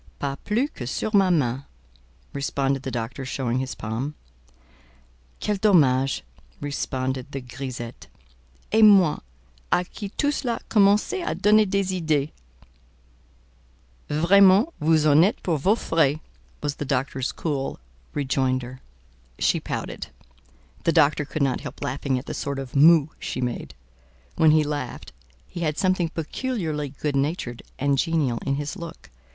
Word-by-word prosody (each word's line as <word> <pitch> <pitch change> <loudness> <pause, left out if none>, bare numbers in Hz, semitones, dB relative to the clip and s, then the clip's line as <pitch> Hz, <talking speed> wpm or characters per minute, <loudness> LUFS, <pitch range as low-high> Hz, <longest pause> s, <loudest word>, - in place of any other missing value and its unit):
"Pas 140 -1 -3
plus 235 +7 +1
que 125 - -7
sur 215 - -2
ma 195 -2 +5
main," 135 -6 +1 0.7
responded 140 -1 -1
the 135 - -4
doctor, 120 +2 -4
showing 130 -1 -2
his 130 -1 -4
palm. 115 +8 -4 1.2
"Quel 210 -1 -1
dommage!" 135 - +3 0.4
responded 130 -2 -3
the 135 - -4
grisette: 125 -2 -7 0.6
"et 220 - +4
moi—à 65 - +3
qui 205 - -6
tout 290 0 +2
cela 240 -5 -2
commençait 210 - +3
à - - -3
donner 215 0 +5
des 195 -1 0
idées." 155 -2 +1 1.8
"Vraiment! 195 - +5
vous 155 0 +3
en 150 0 +6
êtes 200 - 0
pour 165 -5 0
vos 195 +10 +3
frais," 155 -6 +1 0.4
was 145 -1 -2
the - - -3
doctor's 135 -1 -1
cool 140 - -3 0.4
rejoinder. 130 -2 -1 0.6
She - - +2
pouted. - - -5 0.8
The 165 - +3
doctor 150 +1 +3
could 145 +1 -2
not 135 -2 0
help - - -8
laughing 135 -1 -1
at 125 - -6
the - - -5
sort 140 -1 -3
of 135 -1 -7
"moue" 155 +1 +6
she - - -4
made: 120 - -4 0.6
when 160 - +5
he 155 0 +5
laughed, 145 -1 -5 0.3
he - - -8
had 155 -3 -1
something 185 -3 +1
peculiarly 165 - -3
good 145 +1 -3
natured 135 -4 -2 0.2
and 140 0 +1
genial 145 -6 +1
in 140 - 0
his 145 +5 -4
look. 170 -4 -10
145 Hz, 140 wpm, -24 LUFS, 130-175 Hz, 1.8 s, en